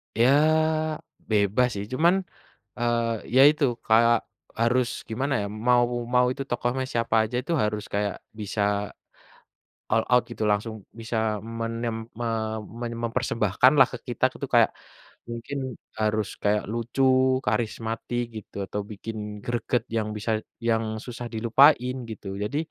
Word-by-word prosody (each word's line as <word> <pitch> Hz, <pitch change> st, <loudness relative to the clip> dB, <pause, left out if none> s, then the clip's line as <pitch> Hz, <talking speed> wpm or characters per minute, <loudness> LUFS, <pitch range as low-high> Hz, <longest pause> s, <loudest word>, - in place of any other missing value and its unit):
Ya 115 Hz, +3 st, +4 dB, 1.0 s
bebas 105 Hz, +3 st, +3 dB
sih, 100 Hz, -, -3 dB
cuman 175 Hz, +7 st, +3 dB, 0.5 s
eee, 115 Hz, -2 st, 0 dB
ya 130 Hz, -, +8 dB
itu, 150 Hz, 0 st, +3 dB, 0.2 s
kayak 115 Hz, +1 st, +4 dB, 0.3 s
harus 120 Hz, +1 st, +3 dB, 0.2 s
gimana 135 Hz, +5 st, -1 dB
ya 100 Hz, -, -2 dB, 0.2 s
mau 120 Hz, -1 st, +5 dB, 0.3 s
mau 125 Hz, 0 st, +5 dB
itu 135 Hz, -, -4 dB
tokohnya 120 Hz, +2 st, -1 dB
siapa 115 Hz, -1 st, 0 dB
aja, 110 Hz, +3 st, -4 dB
itu 170 Hz, -, -3 dB
harus 105 Hz, 0 st, -1 dB
kayak 100 Hz, -1 st, 0 dB, 0.2 s
bisa 105 Hz, 0 st, -3 dB, 1.3 s
all -, -, +3 dB
out 125 Hz, -, +6 dB
gitu 115 Hz, -2 st, -3 dB
langsung 105 Hz, +2 st, 0 dB, 0.3 s
bisa 115 Hz, +1 st, -4 dB, 0.4 s
menem 115 Hz, 0 st, -2 dB, 0.3 s
me 120 Hz, -, -1 dB, 0.5 s
meny 120 Hz, -1 st, -3 dB
mempersembahkan 115 Hz, -1 st, +2 dB
lah 135 Hz, -, +8 dB
ke 125 Hz, -, -5 dB
kita 120 Hz, -, -1 dB
itu, 140 Hz, -, -6 dB
kayak 115 Hz, -2 st, +6 dB, 0.6 s
mungkin 115 Hz, +4 st, -5 dB, 0.4 s
harus 110 Hz, -1 st, +1 dB, 0.2 s
kayak 105 Hz, 0 st, +2 dB
lucu, 120 Hz, +3 st, -1 dB, 0.4 s
karismatik 115 Hz, +2 st, -1 dB, 0.2 s
gitu -, -, -29 dB
atau 105 Hz, +2 st, -3 dB
bikin 110 Hz, +2 st, -6 dB, 0.3 s
greget 120 Hz, 0 st, 0 dB
yang 110 Hz, -1 st, 0 dB
bisa 110 Hz, +2 st, -2 dB, 0.4 s
yang 115 Hz, -1 st, +2 dB, 0.2 s
susah 120 Hz, -1 st, -6 dB
dilupain 125 Hz, +3 st, +4 dB
gitu. 105 Hz, -2 st, -8 dB, 0.2 s
Jadi, 140 Hz, +8 st, -2 dB
115 Hz, 135 wpm, -26 LUFS, 110-125 Hz, 1.3 s, ya